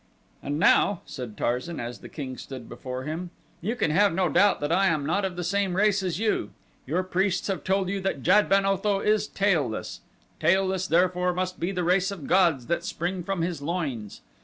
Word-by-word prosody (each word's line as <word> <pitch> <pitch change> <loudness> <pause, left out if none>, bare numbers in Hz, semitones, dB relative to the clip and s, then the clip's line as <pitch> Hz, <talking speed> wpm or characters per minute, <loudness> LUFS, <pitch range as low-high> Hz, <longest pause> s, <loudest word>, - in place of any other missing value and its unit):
"And 145 +1 -3
now," 180 +3 +4
said 125 -5 -7
Tarzan 125 +8 -2
as 120 0 -5
the - - -11
king 130 -4 -6
stood 130 -3 -9
before 130 0 -6
him, 160 +5 -4 0.3
"you 215 +7 -2
can 165 - 0
have 200 +5 +4
no 185 -2 +2
doubt 205 +4 +4
that 145 +2 -1
I 195 +3 +4
am 155 -5 0
not 190 +7 0
of 190 -2 -2
the 180 - -4
same 190 +1 0
race 205 0 +3
as 180 -3 -2
you. 210 - 0 0.4
Your 175 +7 0
priests 185 0 0
have 185 -6 -2
told 190 0 +1
you 195 +1 -2
that 185 -8 -2
Jad 205 +4 +4
ben 195 0 +4
Otho 195 +1 +1
is 210 0 +1
tailless. 160 - -1 0.4
Tailless, 190 0 +2
therefore, 180 +1 +2
must 185 0 -2
be 175 +3 -1
the 180 -2 -2
race 180 +3 +2
of 190 -8 -7
gods 170 -8 +3
that 170 +3 -1
spring 180 +2 -3
from 180 -1 -2
his 170 -4 -3
loins. 140 - -4
180 Hz, 205 wpm, -26 LUFS, 155-195 Hz, 0.4 s, now